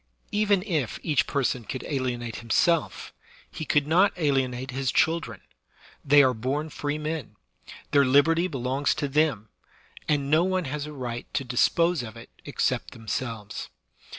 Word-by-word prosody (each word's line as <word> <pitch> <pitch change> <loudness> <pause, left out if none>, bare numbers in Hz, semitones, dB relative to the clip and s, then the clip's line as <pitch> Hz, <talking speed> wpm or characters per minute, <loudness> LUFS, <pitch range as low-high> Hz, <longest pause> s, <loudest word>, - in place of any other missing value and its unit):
Even 205 -3 +2
if 160 - -1
each 150 -4 +1
person 130 -3 0
could 130 +4 -5
alienate 125 -4 -3
himself, 160 +8 0 0.4
he 155 - -6
could 145 0 +2
not 180 +6 +4
alienate 135 -4 0
his 135 0 -1
children; 160 - 0 0.6
they 145 0 +6
are 130 -1 +3
bom 135 +7 -2
free 145 0 -3
men; 155 -7 -4 0.6
their 140 -1 +5
liberty 155 +6 +4
belongs 135 -1 -1
to 150 -2 -2
them, 135 -7 +1 0.6
and 140 -2 0
no 155 +2 +5
one 185 -1 0
has 145 +2 -4
a - - -7
right 120 -4 -6
to - - 0
dis 125 -1 +3
pose 170 -2 +1
of 115 -2 -8
it 115 - -12
except - - -1
themselves. 115 -2 -5
140 Hz, 150 wpm, -26 LUFS, 125-155 Hz, 0.6 s, they